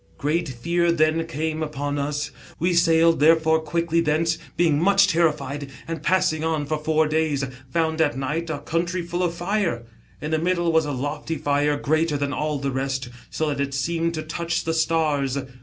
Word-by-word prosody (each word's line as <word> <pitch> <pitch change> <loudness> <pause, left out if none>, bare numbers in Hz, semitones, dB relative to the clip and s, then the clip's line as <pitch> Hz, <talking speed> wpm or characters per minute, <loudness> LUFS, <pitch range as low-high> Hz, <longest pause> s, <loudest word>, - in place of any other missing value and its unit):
Great 160 +2 0
fear 170 +8 0
then 160 0 +2
came 160 0 -3
upon 145 -1 -3
us. 145 +1 -2 0.3
We 175 +2 +1
sailed, 165 -1 +4
therefore, 160 +1 +4
quickly 165 +2 0
thence, 160 +1 +1 0.2
being 160 -4 +3
much 195 +2 +5
terri 170 -3 +3
fied, 140 0 -6 0.2
and 165 -2 -4
passing 170 -1 +1
on 160 -2 0
for 155 +1 -2
four 155 0 +2
days, 155 -3 0 0.3
found 160 -1 +1
at 145 -4 +1
night 150 +5 -2
a 160 - -2
country 170 +4 -2
full 175 +1 -3
of 175 -2 0
fire. 175 - -1 0.4
In 150 - -5
the 160 - +2
middle 175 0 +1
was 160 -2 +2
a - - -2
loicy 145 +4 -3
fire, 145 +1 +1
greater 155 +1 +1
than 140 0 -2
all 150 -1 -1
the 140 0 -2
rest, 130 -1 -2 0.2
so 155 -1 -1
that 140 -1 -2
it 140 -1 -2
seemed 165 +4 -1
to 155 - -3
touch 170 +2 -2
the 165 - -1
stars. 155 -4 +1
160 Hz, 190 wpm, -23 LUFS, 145-165 Hz, 0.4 s, much